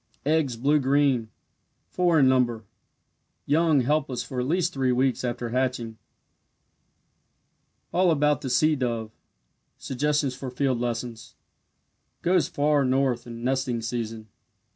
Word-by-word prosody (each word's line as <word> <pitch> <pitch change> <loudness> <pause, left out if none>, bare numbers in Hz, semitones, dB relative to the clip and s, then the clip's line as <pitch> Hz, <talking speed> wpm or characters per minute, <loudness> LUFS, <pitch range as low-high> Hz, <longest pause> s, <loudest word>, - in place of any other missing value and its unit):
Eggs 150 -4 +1
blue 145 +5 +2
green 135 -4 +2 0.6
four 175 -2 +1
in 130 - +5
number 120 -3 +2 0.8
young 155 -1 +3
helpless 135 -1 -1
for 130 - -5
at 125 - -1
least 175 +3 0
three 130 -2 +1
weeks 130 +1 +1
after 120 -1 -3
hatching. 120 -3 -2 1.9
ALL 180 0 +3
ABOUT 150 -2 +2
THE 135 - -4
SEA 155 +5 +3
DOVE 115 -5 -3 0.7
SUGGESTIONS 145 +1 -1
FOR 130 0 -6
FIELD 130 -1 -1
LESSONS 120 -1 -4 0.9
Goes 180 0 +2
far 145 0 +1
north 130 -2 0
in 115 0 -8
nesting 130 -2 0
season. 115 -2 -4
130 Hz, 120 wpm, -25 LUFS, 120-145 Hz, 1.9 s, in